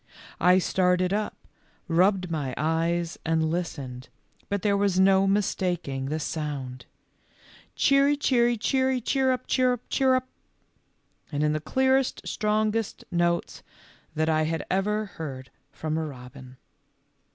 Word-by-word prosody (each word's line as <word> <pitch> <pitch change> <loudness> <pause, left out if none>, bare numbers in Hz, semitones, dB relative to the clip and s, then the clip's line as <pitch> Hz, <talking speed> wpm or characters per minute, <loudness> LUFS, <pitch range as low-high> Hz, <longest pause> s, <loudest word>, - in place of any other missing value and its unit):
I 180 +2 +5
started 180 0 +1
up, 210 +1 -2 0.5
rubbed 180 +1 +2
my 140 -5 -2
eyes, 165 +2 -1
and 160 -1 +1
listened, 140 -7 -5 0.4
but 200 -2 -2
there 205 -1 +2
was 200 -2 +1
no 190 0 +5
mistaking 180 -8 -1
the 155 +3 -2
sound: 140 -6 -5 0.9
Cheery, 275 +1 +4
cheery, 240 -4 +2
cheery, 260 +3 +1
chirrup, 260 +1 0
chirrup, 250 -2 +1
chirrup, 260 -1 +2 1.0
and 145 0 -1
in 150 0 +2
the 155 - -1
clearest, 265 - +1
strongest 215 0 -1
notes 170 0 0 0.5
that 155 +1 +1
I 155 -1 +2
had 160 0 -2
ever 210 +3 0
heard 135 - -8 0.2
from 155 0 -3
a - - -2
robin. 125 -1 -11
180 Hz, 120 wpm, -26 LUFS, 155-215 Hz, 1.0 s, I